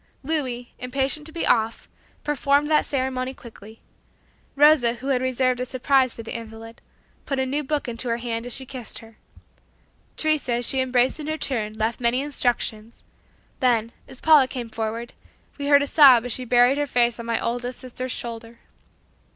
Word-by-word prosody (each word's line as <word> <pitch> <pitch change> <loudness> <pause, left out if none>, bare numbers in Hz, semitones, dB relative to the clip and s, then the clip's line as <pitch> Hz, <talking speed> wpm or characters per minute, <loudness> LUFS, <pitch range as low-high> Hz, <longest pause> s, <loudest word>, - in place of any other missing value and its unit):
Louis, 260 -5 -3
impatient 270 +4 -2
to - - -10
be 335 +1 -2
off, 225 +1 +1 0.4
performed 290 0 +1
that 305 - +3
ceremony 260 -1 -2
quickly; 220 -2 -14 0.7
Rosa 285 -5 +5
who 265 +3 -6
had 255 -2 +1
reserved 255 -1 0
a - - -1
surprise 260 0 +2
for 230 - -8
the 225 - -7
invalid, 225 0 -9 0.5
put 275 - -1
a 265 - 0
new 285 +3 -2
book 295 0 -2
into 240 +1 -3
her 230 - 0
hand 235 0 -4
as 245 - -2
she 265 - -4
kissed 255 -3 -5
her; 225 -1 -13 1.0
Teresa, 310 -5 +2
as 240 0 0
she 265 - +1
embraced 255 +2 +1
her - - -4
in 295 - -7
her 310 0 -2
turn, 220 -8 -2
left 220 +3 -1
many 240 +1 +2
instructions; 240 -5 -2 0.6
then, 235 -3 +1 0.2
as 260 - -9
Paula 305 -4 +6
came 245 -3 -6
forward, 225 +2 -4 0.5
we 285 - -3
heard 285 0 +5
a - - -1
sob 270 -5 +6
as 245 - -4
she 255 - -3
buried 245 +3 +4
her 290 - 0
face 240 -2 +1
on 230 - -7
my 230 -1 0
oldest 245 +1 -3
sister's 255 0 -6
shoulder. 230 -1 -7
250 Hz, 185 wpm, -23 LUFS, 235-275 Hz, 1.0 s, Paula